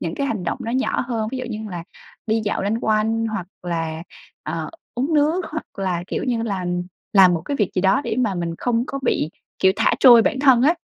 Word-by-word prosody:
những 165 0 -3
cái 280 - -1
hành 215 -8 -3
động - - -2
nó 230 - -3
nhỏ 260 +1 0
hơn, 225 -3 -2
ví 260 - -3
dụ 255 - -4
như 225 -3 -5
là 170 -2 -6 0.4
đi 225 0 +1
dạo 205 - -1
loanh 205 +3 0
quanh 220 +1 +1
hoặc 200 -5 -4 0.2
là, 165 -2 -3 0.4
ờ, - - -4 0.2
uống 270 +7 -1
nước 310 +5 +2
hoặc 315 0 -4
là, 180 -3 -1
kiểu - - -3
như 235 -3 0
là, 195 -5 -2 0.5
làm 185 -3 +7
một 160 - -3
cái 285 - -2
việc 205 -5 +1
gì 185 - +1
đó 195 +5 +4
để - - -2
mà 220 -6 +1
mình 170 -1 -3
không 240 -1 0
có 275 - -4
bị, 160 - 0 0.3
kiểu, 190 0 +4
thả 225 - +3
trôi 240 -4 +9
bản 265 - 0
thân 265 -4 +5
á. 315 +5 +5
220 Hz, 235 wpm, -21 LUFS, 185-255 Hz, 0.5 s, trôi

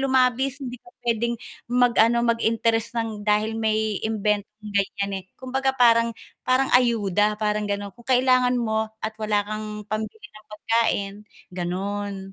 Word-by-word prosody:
lumabis, 260 0 +2
hindi 250 -3 -6
ka - - -18 0.2
pwedeng 235 +1 +1 0.3
mag-ano, 235 -1 +4
mag-interest 230 0 +1
nang 220 -2 -3
dahil 210 +1 +2
may, 215 -1 0
imbentong 210 -1 -2
ganyan, 200 0 0
eh. - - -19
Kumbaga, 265 +1 0
parang 230 -1 +5 0.3
parang 260 +1 +2
ayuda 210 -4 +3
parang 210 -1 0
ganon, 200 -1 -3
kung 240 +1 -17
kailangan 255 0 +4
mo 220 -1 0 0.2
at 220 - -2
wala 210 -1 +1
kang 215 0 -5
pambili 215 0 -5
ng 215 0 -16
pagkain, 210 -2 0 0.4
ganon. 195 +2 -4
220 Hz, 135 wpm, -24 LUFS, 210-240 Hz, 0.4 s, parang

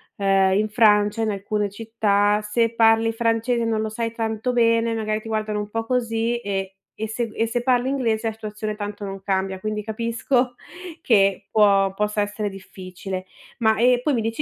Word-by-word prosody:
uhm, 195 -1 +3
in 215 +2 +1
Francia, 210 0 +3
in 215 - 0
alcune 205 +1 -2
città, 210 -1 +1
se 230 +2 0
parli 225 0 +4
francese 230 +1 0
e - - 0
non 220 -1 0
lo 220 - -2
sai 230 +1 -3
tanto 225 +1 -2
bene, 230 -1 +3
magari 215 -1 -1
ti 225 - -11
guardano 215 -1 -2
un 210 0 -5
po' 225 +1 -3
così 235 -1 0
e 195 -3 -3 0.3
e 220 - -2
se 230 +2 -2
g 215 - -14
e 225 - +1
se 240 +1 -2
parli 250 0 +2
inglese 230 -5 0
la 225 - 0
situazione 215 -1 -5
tanto 205 -1 -6
non 195 0 -6
cambia, 190 -1 -1
quindi 215 +1 -3
capisco 235 +3 -1 0.5
che 195 -5 +3
può 200 -2 +4
possa 210 +1 -1
essere 205 0 -2
difficile. 185 -1 -8 0.3
Ma, 220 -1 +3
ehm, 245 +1 +4
poi 285 0 +1
mi 230 - 0
dici 225 +6 -2
220 Hz, 190 wpm, -23 LUFS, 205-230 Hz, 0.5 s, parli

